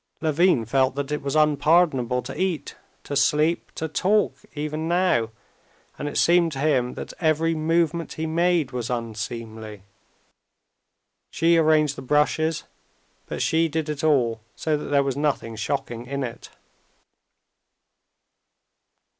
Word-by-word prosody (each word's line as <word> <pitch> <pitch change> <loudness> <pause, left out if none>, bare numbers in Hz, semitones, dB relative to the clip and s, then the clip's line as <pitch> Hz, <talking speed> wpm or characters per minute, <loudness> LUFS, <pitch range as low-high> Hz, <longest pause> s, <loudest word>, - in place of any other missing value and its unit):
Levin 160 -5 +2
felt 130 +3 +1
that 140 0 -3
it 150 - -1
was 140 +1 -3
unpardonable 150 -4 +3
to 135 - -7
eat, 185 -4 -2 0.3
to 145 - -5
sleep, 150 +4 +2
to 160 - -3
talk 200 +6 +1 0.2
even 155 +2 -3
now, 175 -10 +2 0.7
and 145 - -3
it - - -5
seemed 170 -1 +4
to 140 - -6
him 135 -4 +1
that - - -7
every 160 0 +2
movement 165 +1 0
he 160 - -4
made 165 -3 +1
was 125 -2 -4
unseemly. 110 -2 -5 1.5
She 170 +1 +2
arranged 155 -3 +3
the - - -6
brushes, 150 +3 +1 0.6
but - - -3
she 165 +1 +2
did 160 0 -3
it 150 -1 -4
all 120 -8 +2
so 155 -1 0
that 150 - -4
there 140 -1 +2
was 135 -2 -2
nothing 140 -6 -1
shocking 115 +3 -3
in 140 +1 -3
it. 120 -3 -7
150 Hz, 135 wpm, -24 LUFS, 125-160 Hz, 1.5 s, seemed